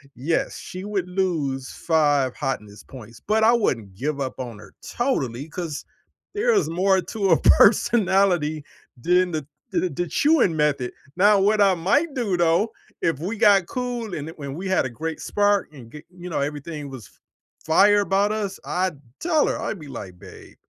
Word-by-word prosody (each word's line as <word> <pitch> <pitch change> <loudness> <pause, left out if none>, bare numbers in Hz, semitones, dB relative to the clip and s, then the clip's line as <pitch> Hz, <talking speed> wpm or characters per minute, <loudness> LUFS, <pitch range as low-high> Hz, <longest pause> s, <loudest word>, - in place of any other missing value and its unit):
yes, 155 +7 -1
she 185 +1 -8
would 195 -3 -2
lose 155 -9 -1
5 145 -5 +1
hotness 105 -7 -5
points, 115 -3 -13
but 220 +1 +2
I 230 +2 +6
wouldn't 115 - 0
give 145 +6 -3
up 130 -1 -4
on 120 -4 -6
her - - -15
totally, 140 - -2
'cause 165 -3 -5 0.5
there 455 +3 +2
is 405 - +2
more 190 +3 +2
to 200 -2 -2
a 165 - +5
personality 190 -9 +3 0.3
than 180 +7 +2
the 155 -3 -4 0.2
the 185 - 0
the 175 +4 -3
chewing 290 - +3
method, 145 -5 0 0.2
now 205 +2 +5
what 210 +2 +2
I 195 -2 +5
might 275 - +1
do 215 -9 -1
though, 175 +6 +2 0.3
if 165 -5 0
we 190 +8 -3
got 200 -5 +5
cool 245 -4 -4
and 155 0 -5
it 165 - -13
when 140 -2 -6
we 190 +4 -5
had 185 - +2
a - - -3
great 160 +6 -5
spark 205 -1 +1
and 120 -5 -13
g 150 0 -11
you 180 0 -9
know, 160 - -2
everything 145 +1 -4
was 130 -7 -10
f - - -27 0.5
fire 205 +6 +5
about 200 +1 +1
us, 205 -3 -3
I'd 180 -4 -2 0.2
tell 320 -3 +2
her, - - -1
I'd 205 - -4
be 150 - -10
like, 95 -8 -8
"Babe, - - -14
175 Hz, 185 wpm, -23 LUFS, 145-205 Hz, 0.5 s, I